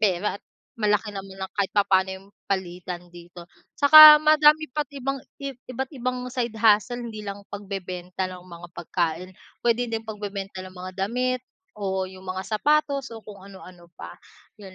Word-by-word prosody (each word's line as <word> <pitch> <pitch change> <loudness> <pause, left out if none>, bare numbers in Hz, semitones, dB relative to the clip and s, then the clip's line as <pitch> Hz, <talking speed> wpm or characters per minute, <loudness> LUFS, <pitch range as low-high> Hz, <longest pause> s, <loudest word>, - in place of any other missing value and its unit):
pera 200 -1 +1
at - - -56 0.3
malaki 210 -1 0
naman 195 -1 -7
kahit 200 -2 -1
papaano 190 -2 +3
'yong 190 +1 -14 0.2
palitan 180 -2 -4
dito. 175 0 -13 0.3
Saka 305 +1 +11
madami 310 0 +5
pa't 300 -1 -3
ibang 275 +1 -3 0.2
iba't 260 -1 -6
ibang 250 -1 -3
side 240 -3 -2
hustle 225 +3 +3
hindi 215 -2 -8
lang 200 0 -7
pagbebenta 190 -2 -5
ng 180 -1 -10
mga 175 -1 -11
pagkain. 170 +1 -2 0.3
Puwede 240 +1 +1
din 225 -1 -3
pagbebenta 205 -3 -6
ng 185 0 -12
mga 185 +1 -8 0.2
damit 255 +2 -1 0.4
o 190 -2 -2
'yong 185 0 -13
mga 185 +1 -4 0.2
sapatos 290 0 +1
o 225 - -9
kung 200 -3 -12
ano-ano 185 -3 -14
pa, - - -9 0.5
'yon. 195 -2 -12
200 Hz, 155 wpm, -24 LUFS, 185-250 Hz, 0.5 s, Saka